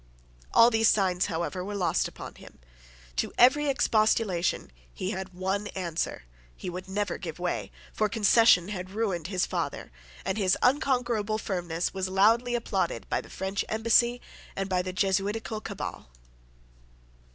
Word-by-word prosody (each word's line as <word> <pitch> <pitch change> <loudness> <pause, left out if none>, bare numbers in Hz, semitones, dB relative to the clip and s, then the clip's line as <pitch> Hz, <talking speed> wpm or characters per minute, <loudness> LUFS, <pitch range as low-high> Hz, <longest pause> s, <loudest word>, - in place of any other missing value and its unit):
All 235 +1 +6
these 225 0 +3
signs, 185 -4 +2
however, 175 +1 -3
were 205 +2 -5
lost 185 -3 +1
upon - - -9
him. - - -15 0.6
To - - 0
every 290 +5 +5
expostulation 215 - +1 0.2
he 185 - -4
had 190 -1 -6
one 190 +3 -2
answer: 170 - -3 0.3
he 180 - -5
would 185 +2 -7
never 205 +1 -2
give 165 -5 -6
way; 180 0 -3 0.2
for 215 0 +1
concession 210 -3 +5
had 185 -2 -5
ruined 195 -6 -2
his 185 -2 0
father; - - -4 0.3
and 205 - -1
his 190 -2 +2
unconquerable 245 -5 +1
firmness 175 -5 -2
was 190 -1 -2
loudly 225 +6 +3
applauded 235 - -2
by - - 0
the - - -15
French 190 +1 -3
embassy 230 +2 +3 0.4
and 195 0 -2
by 185 -2 +1
the 185 0 -4
Jesuitical 205 +3 -1
cabal. - - -6
195 Hz, 145 wpm, -28 LUFS, 185-225 Hz, 0.6 s, All